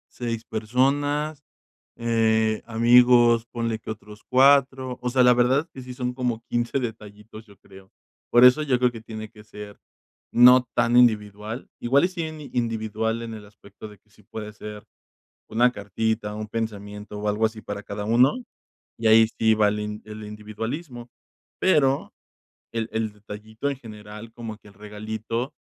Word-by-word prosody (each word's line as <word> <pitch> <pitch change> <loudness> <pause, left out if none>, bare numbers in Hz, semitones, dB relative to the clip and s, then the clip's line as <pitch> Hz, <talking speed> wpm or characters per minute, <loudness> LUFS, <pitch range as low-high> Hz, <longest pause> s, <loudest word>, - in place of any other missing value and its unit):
6 115 -2 -4
personas, 145 +7 0 0.5
eh, 110 -2 +1
amigos, 120 0 +5
ponle 115 -2 -2
que 110 - -9
otros 105 -1 -10
4 130 -1 +3
o 125 - -1
sea, 130 0 +3
la 125 0 +6
verdad 125 +3 +3
es 165 - -11
que 130 - -11
sí 125 0 -8
son 125 -1 -4
como 125 -3 -2
15 120 +3 -1
detallitos, 110 -2 -8
yo 100 -3 -20
creo, 95 -1 -17 0.4
por 120 - +5
eso 125 +5 +5
yo 130 -4 +1
creo 125 0 +3
que 115 -2 -10
tiene 110 -1 -8
que 105 -2 -17
ser 105 -1 -11 0.5
no 125 +1 +7
tan 120 +1 +2
individual, 110 -1 +1
igual 140 +7 +3
y - - -3
sí 180 -2 -5 0.3
individual 110 -1 -1
en 115 -1 -6
el 105 - -10
aspecto 105 +1 -14
de 105 -1 -13
que 105 - -39
sí 105 - -23
puede 105 +1 -8
ser 105 -1 -9 0.7
una 120 +2 +3
cartita, 105 0 -3
un 105 0 -6
pensamiento 105 -2 -5
o 105 0 -1
algo 105 +2 +1
así 110 0 -3
para 100 -1 -6
cada 105 0 -6
uno, 125 - +3 0.6
y 115 - +1
ahí 110 0 +7
sí 110 0 +4
va 105 -1 +3
el 105 - -1
in 105 0 -5
el 110 0 -8
individualismo, 115 +5 -7 0.5
pero 140 -7 +2 0.6
el 115 0 -2
el 110 -1 -2
detallito 110 +5 -6
en 140 - -4
general, 105 -1 -11
como 115 -2 -7
que 105 - -20
el 100 - -16
regalito, 110 +4 -5
110 Hz, 170 wpm, -24 LUFS, 105-125 Hz, 0.7 s, no